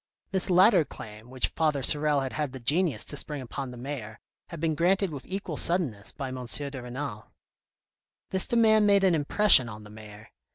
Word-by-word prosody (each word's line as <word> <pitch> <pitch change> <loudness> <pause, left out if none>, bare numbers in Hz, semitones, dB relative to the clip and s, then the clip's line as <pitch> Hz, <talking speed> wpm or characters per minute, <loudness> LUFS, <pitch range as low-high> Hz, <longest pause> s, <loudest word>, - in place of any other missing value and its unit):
This 190 -1 0
latter 185 0 +5
claim, 110 -4 -11
which 130 0 -2
Father 150 -4 -1
Sorel 150 0 +3
had 135 -1 -5
had 150 -4 -3
the 130 - -8
genius 145 - 0
to - - -4
spring 145 0 -3
upon 130 +1 -6
the 125 - -10
mayor, 120 -4 -7 0.3
had 170 - -9
been 160 0 -1
granted 185 +3 +1
with 140 -3 -9
equal 185 -5 -5
suddenness 145 - +2
by 135 -3 -6
M. 130 0 -7
de 140 +1 -2
Renal. 125 -3 -7 1.0
This 190 0 +1
demand 220 -3 +3
made 200 -1 +3
an 185 -2 +3
impression 150 - +4
on 105 -1 -10
the 105 - -14
mayor. 105 0 -13
145 Hz, 190 wpm, -27 LUFS, 125-175 Hz, 1.0 s, latter